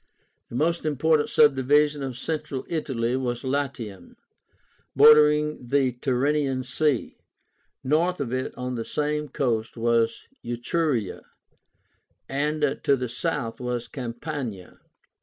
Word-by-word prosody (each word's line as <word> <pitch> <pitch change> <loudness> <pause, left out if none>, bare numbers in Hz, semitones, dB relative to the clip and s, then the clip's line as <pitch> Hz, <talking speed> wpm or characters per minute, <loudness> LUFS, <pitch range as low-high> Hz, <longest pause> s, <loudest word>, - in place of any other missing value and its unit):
The - - -8
most 165 +6 +1
important 155 0 +2
subdivision 145 +1 +4
of 130 -3 -4
Central 150 -2 -4
Italy 130 -7 -1
was 125 -2 -2
LATIUM, 130 -9 -4 0.8
bordering 150 +1 +7
on 125 - -13
the 135 0 +2
Tyrrhenian 135 +2 0
Sea. 135 +1 -1 0.6
North 165 +6 +1
of 130 -4 -3
it 130 0 -2
on 125 0 -3
the 115 -2 -3
same 150 +3 -2
coast 120 -5 -1
was 115 0 +1 0.2
ETRURIA, 120 - -1 1.1
and 150 +1 0
to 140 - +4
the 125 -2 -4
south 115 -1 -3
was 125 -1 -3
CAMPANIA. 120 - -6
135 Hz, 115 wpm, -25 LUFS, 120-150 Hz, 1.1 s, bordering